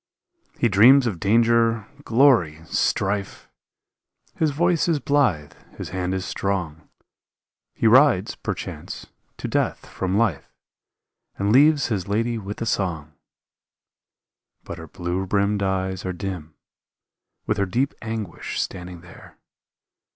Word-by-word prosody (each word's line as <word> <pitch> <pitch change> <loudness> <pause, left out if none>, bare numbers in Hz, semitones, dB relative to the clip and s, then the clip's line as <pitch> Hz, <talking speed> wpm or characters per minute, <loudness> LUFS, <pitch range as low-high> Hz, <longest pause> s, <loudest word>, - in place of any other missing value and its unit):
He 120 - +2
dreams 120 +7 +6
of 100 -8 -2
danger, 115 +1 +2 0.2
glory, 115 - +3
strife. 100 +4 -1 0.9
His 160 - +1
voice 170 +4 +1
is 165 -3 +1
blithe, 135 - +1 0.2
his - - -6
hand 90 0 -2
is 95 -1 -3
strong, 85 -6 -3 0.9
He - - -2
rides 120 -4 +5
perchance - - -6 0.3
to - - -5
death - - -1
from 95 +1 -2
life 105 -10 0 0.9
And 100 +1 0
leaves 145 +2 +5
his 100 -4 -2
lady 115 +3 -1
with 100 0 -7
a - - -3
song; 85 -8 -2 1.5
But 85 - -8
her 80 - -9
blue 90 +3 -4
brimmed 100 +1 +1
eyes 95 -1 -2
are 95 - -3
dim 90 -4 -6 0.9
With - - -1
her 100 - 0
deep 125 +9 0
anguish 110 -6 -5
standing 90 -2 -5
there. 90 -1 -15
100 Hz, 120 wpm, -23 LUFS, 90-115 Hz, 1.5 s, dreams